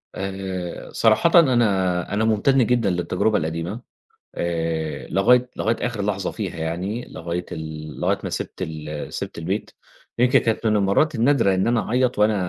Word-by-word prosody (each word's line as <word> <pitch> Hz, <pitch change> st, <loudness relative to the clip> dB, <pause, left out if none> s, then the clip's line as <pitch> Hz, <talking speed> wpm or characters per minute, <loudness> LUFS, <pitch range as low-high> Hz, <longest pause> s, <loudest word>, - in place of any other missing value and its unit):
آآ، 95 Hz, -2 st, -5 dB
صراحةً 115 Hz, +11 st, +5 dB
أنا 100 Hz, -, +2 dB
أنا 110 Hz, +2 st, +1 dB
ممتنّ 120 Hz, +4 st, +3 dB
جدًا 120 Hz, -3 st, +2 dB
للتجربة 90 Hz, +4 st, +1 dB
القديمة 85 Hz, +8 st, -3 dB, 0.5 s
آآ، 80 Hz, -2 st, -2 dB
لغاية، 125 Hz, +6 st, +3 dB
لغاية 115 Hz, +1 st, 0 dB
آخر 115 Hz, -4 st, -3 dB
لحظة 100 Hz, -2 st, -1 dB
فيها 95 Hz, -6 st, -5 dB
يعني 90 Hz, +9 st, -3 dB
لغاية 85 Hz, +1 st, -4 dB
ال 80 Hz, -1 st, -7 dB
لغاية -, -, +1 dB
ما -, -, -3 dB
سِبت -, -, -4 dB
ال 75 Hz, -1 st, -6 dB
سِبت -, -, -5 dB
البيت 95 Hz, +6 st, -3 dB, 0.5 s
يمكن 125 Hz, +1 st, +5 dB
كانت 115 Hz, 0 st, -1 dB
من 110 Hz, -1 st, +3 dB
المرات 105 Hz, +10 st, +2 dB
النادرة 115 Hz, -4 st, +3 dB
إن 95 Hz, -, +1 dB
أنا 120 Hz, 0 st, +2 dB
أعيّط 125 Hz, 0 st, +1 dB
وأنا 105 Hz, +1 st, +4 dB
100 Hz, 155 wpm, -22 LUFS, 85-115 Hz, 0.5 s, صراحةً